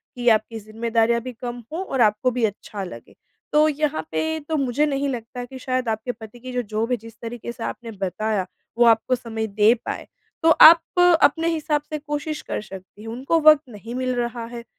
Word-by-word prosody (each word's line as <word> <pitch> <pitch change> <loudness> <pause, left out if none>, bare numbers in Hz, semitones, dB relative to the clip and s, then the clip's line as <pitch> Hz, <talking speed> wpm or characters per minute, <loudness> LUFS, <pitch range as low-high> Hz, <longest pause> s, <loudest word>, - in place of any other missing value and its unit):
कि 245 -1 -4
आपकी 220 0 +1
ज़िम्मेदारियाँ 230 +2 0
भी 255 - -6
कम 240 0 -7
हों 365 +3 -2
और 265 -7 -1
आपको 215 +3 +3
भी 245 -1 -2
अच्छा 205 -1 -5
लगे, 115 -11 -10 0.4
तो 305 +1 +5
यहाँ 300 0 -1
पे 320 0 -1
तो 315 - 0
मुझे 275 +2 +1
नहीं 280 -1 -1
लगता 245 0 -5
कि 260 +1 -10
शायद 255 -2 -1
आपके 220 +3 -2
पति 220 0 -12
की 255 +1 -8
जो 250 - 0
जॉब 220 +2 -3
है 245 - +2
जिस 225 +1 -13
तरीके 235 0 -6
से 235 -1 -8
आपने 235 -2 -5
बताया, 195 0 -2 0.3
वो 240 - +5
आपको 230 +2 +4
समय 225 -2 -4
दे 210 +3 +4
पाएँ। - - -4 0.4
तो 330 - +5
आप 330 +1 +10 0.4
अपने 325 +3 +3
हिसाब 300 -2 0
से 305 - -3
कोशिश 300 +1 -4
कर - - -4
सकती 190 0 -12
हैं। 225 - -8
उनको 265 +8 0
वक़्त 305 -1 +7
नहीं 225 +2 -8
मिल 255 0 -1
रहा 240 -1 -3
है, 235 0 -8
240 Hz, 205 wpm, -23 LUFS, 220-275 Hz, 0.4 s, आप